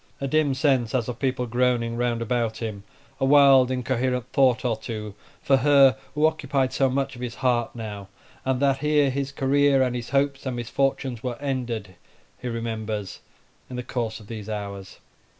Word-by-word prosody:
A 140 - -2
dim 145 -1 +2
sense, 130 -4 +1
as 120 -3 0
of 125 -1 -5
people 130 -2 0
groaning 120 -1 0
round 120 -1 -1
about 115 -2 -1
him, 110 -4 -5 0.4
a - - -2
wild 135 -2 +6
incoherent 125 -1 -1
thought 130 -3 +3
or 120 -2 +1
two 110 -1 -6 0.3
for 135 - +4
her 135 -1 +5 0.2
who 150 +1 +3
occupied 140 -4 0
so 135 -1 +2
much 135 0 -1
of 120 - -10
his 120 -2 -4
heart 120 -2 0
now, 105 -4 -7 0.4
and 130 -1 0
that 135 -1 +2
here 150 -1 +2
his 140 +1 -3
career, 140 0 +3
and 125 -1 -1
his 120 -1 -5
hopes, 140 0 0
and 130 - -2
misfortunes 125 0 -1
were 125 -2 -4
ended, 120 -8 -3 0.5
he 125 - -6
remembers 110 -4 -4 0.5
in 125 - -7
the 125 - -4
course 115 -3 -3
of 110 - -14
these 110 -1 -7
hours. 100 -2 -6
125 Hz, 180 wpm, -25 LUFS, 115-135 Hz, 0.5 s, wild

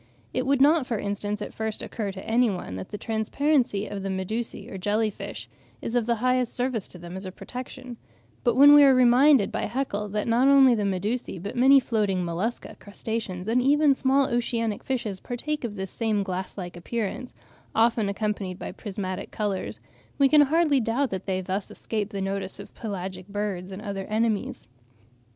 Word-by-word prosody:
It - - -1
would 275 -1 +3
not, 295 -1 +5
for 230 - -1
instance, 205 +1 -3
at - - -8
first 220 -1 -3
occur 210 -4 -4
to 190 0 -9
any 235 +1 +3
one 180 - -5
that 95 - -7
the 210 - -5
transparency 225 0 0
of 200 -2 -5
the 195 - -3
Medusae, 195 +5 -3
or 195 - -7
jelly 210 +3 +1
fish, 110 - -8 0.3
is 230 - -5
of 240 -2 +1
the 235 - +2
highest 255 -1 +1
service 245 -5 -1
to - - -11
them 175 +1 -9
as 190 - -6
a 185 - -6
protection; 250 +3 -8 0.5
but 240 -2 +2
when 285 +3 +9
we 290 0 +9
are 270 -2 +7
reminded 255 -1 +5
by - - -2
Haeckel 210 -6 -2
that 210 +2 -2
not 240 +3 +3
only 275 -2 +7
the 210 -3 0
Medusae, 200 +3 -2
but 200 +4 -6
many 265 +3 +7
floating 205 -7 0
Mollusca, 180 +8 -3
crustaceans, 205 -3 -5
and 240 +3 +2
even 290 +2 +4
small 270 +1 +2
oceanic 230 -3 -1
fishes 225 -7 -3
partake 295 +7 -4
of 220 -3 -4
this 190 -2 -5
same 215 -3 0
glass 185 0 -5
like 175 -2 -6
appearance, 230 +6 -4 0.4
often 225 -2 +3
accompanied 200 -3 -2
by - - -6
prismatic 195 -2 -5
colours, 205 -3 -3 0.4
we 275 - +5
can 300 +2 +6
hardly 300 0 +3
doubt 245 +4 0
that 190 0 -5
they 190 -1 0
thus 190 +2 -3
escape 215 -2 -3
the 200 -2 -4
notice 195 0 -3
of 200 - -10
pelagic 190 -3 -6
birds 200 -3 -3
and 195 +2 -8
other 200 -3 -4
enemies. 215 - -1
215 Hz, 190 wpm, -26 LUFS, 195-250 Hz, 0.5 s, when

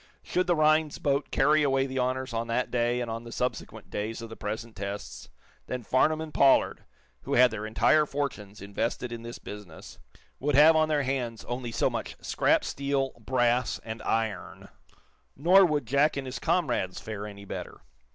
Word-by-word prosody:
Should 180 0 0
the 175 - +3
Rhinds 155 -1 +3
boat 140 0 0
carry 150 +3 +3
away 135 -2 +2
the 130 0 -3
honors 130 0 -1
on 115 0 -2
that 120 +2 -1
day 120 0 +1
and 120 -2 -3
on 115 +1 -5
the 115 - -10
subsequent 125 +2 -4
days 110 +2 -3
of 115 - -8
the 110 - -8
present 110 +2 -5
tests, 100 +1 -6 0.4
then 125 -1 -4
Farnum 155 +7 +2
and 160 -1 -7
Pollard, 135 -1 +3 0.4
who - - -2
had 125 0 +6
their 110 -1 -4
entire 150 +7 +3
fortunes 105 -9 -4
invested 115 +4 -3
in 120 -1 -6
this 115 +1 -7
business, 100 -6 -11 0.4
would 145 +1 0
have 155 +3 +7
on 155 0 +3
their 150 -2 +1
hands 125 -4 -3
only 120 0 -4
so - - +1
much - - -4
scrap - - +2
steel, 140 -1 -1
brass 120 +1 +1
and 110 0 -6
iron. 110 -4 -3 0.7
Nor 180 +6 +6
would 150 -5 -1
Jack 140 +5 +2
and 135 - -3
his 130 0 -5
comrades 120 - 0
fare 105 -1 -6
any 100 -1 -10
better. - - -7
125 Hz, 180 wpm, -28 LUFS, 115-140 Hz, 0.7 s, have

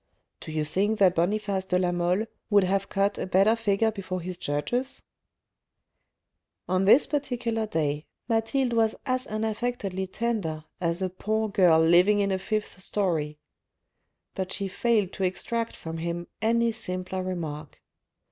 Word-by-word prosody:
Do - - -8
you 155 -1 -1
think 200 +8 0
that 190 -4 +5
Boniface 195 +2 0
de 180 -1 +1
la 180 -1 +1
Mole 175 +4 +1 0.2
would 205 -2 +5
have 195 +1 0
cut 200 +1 0
a - - -2
better 195 +4 +4
figure 220 0 +1
before 185 -3 -4
his 180 +1 -5
judges? 180 - -2 0.8
" - - -55
On 185 +1 +1
this 230 +8 +7
particular 245 -6 -1
day, 150 -4 -1 0.2
Mathilde 235 +2 +1
was 225 -1 +2
as 255 0 -1
unaffectedly 215 -3 -2
tender 190 -7 -2 0.2
as 170 +1 -1
a 185 - 0
poor 215 +3 -1
girl 180 -5 +5
living 175 +5 +5
in 200 -1 +1
a 190 - 0
fifth 210 -1 -3
storey. 165 -7 -1 1.0
But 190 -1 -3
she 200 - -1
failed 210 -1 +1
to 195 - -3
extract 230 +5 -2
from 165 0 -6
him 170 +1 -3 0.2
any 230 +1 +2
simpler 185 -4 -4
remark. 160 -5 -5
195 Hz, 150 wpm, -27 LUFS, 180-220 Hz, 1.0 s, this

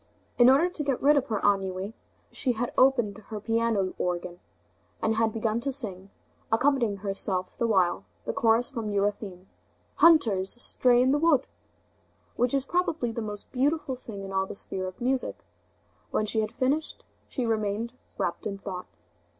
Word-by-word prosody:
In 240 +1 +8
order 280 +7 +5
to 345 -4 -4
get 275 -3 0
rid 295 +2 +5
of 280 -1 +1
her 215 -3 -1
ennui, 195 0 0 0.4
she 255 - 0
had 240 +2 -3
opened 240 -6 +3
her 215 -1 -5
piano 225 -3 0
organ, 175 0 -3 0.6
and 220 - +1
had 225 -1 +2
begun 225 0 -1
to 275 +3 -1
sing, 200 -8 -1 0.4
accompanying 235 -3 +2
herself 190 -2 -2
the 235 - +2
while, 185 -5 +2 0.2
the - - -2
chorus 230 +3 +2
from 230 -5 -4
Euryanthe: 200 -2 -2 0.5
"Hunters 225 - +4
astray 245 0 +4
in 260 - +3
the 290 - +2
wood!" 300 -4 +3 0.9
which 245 +2 +1
is 275 -1 +1
probably 325 -8 0
the 230 - -4
most 210 -1 -6
beautiful 280 +2 0
thing 215 -5 -9
in 195 0 -7
all 190 0 0
the - - -7
sphere 185 -1 -4
of 185 - -9
music. 255 +1 -2 0.6
When 215 - 0
she 220 +1 +1
had 215 0 -3
finished, 275 +6 -2 0.2
she 255 - -3
remained 220 +1 -1 0.2
wrapped 170 +3 -2
in 200 -1 -4
thought. 190 -2 -7
225 Hz, 165 wpm, -27 LUFS, 200-260 Hz, 0.9 s, In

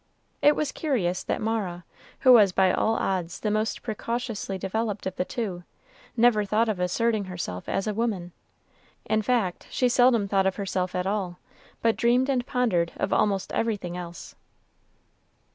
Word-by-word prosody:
It 295 - +5
was 300 -2 -1
curious 200 - -1
that - - -3
Mara, 200 -6 -2 0.4
who 255 - +7
was 210 -5 +7
by 190 0 +3
all 225 - +1
odds 180 -5 -2
the 210 - 0
most 215 +2 -1
precociously 230 -3 -3
developed 210 +3 -3
of 190 - -3
the - - 0
two, 195 -8 -4 0.5
never 230 -2 +4
thought 215 +3 +1
of 210 -4 -1
asserting 210 +4 0
herself 170 - -5
a - - +1
woman; 205 -6 -2 0.7
in 215 - +1
fact, 215 -5 -1
she 250 - +1
seldom 245 -3 +4
thought 195 -1 +2
of 190 - 0
herself 185 -2 -2
at 180 0 -1
all, 190 -3 -2 0.5
but 230 -1 +3
dreamed 245 +3 +3
and 250 -3 0
pondered 200 -10 +1
of - - -1
almost 200 -2 +1
everything 205 -6 -1
else. 175 -1 -8
210 Hz, 160 wpm, -26 LUFS, 185-230 Hz, 0.7 s, who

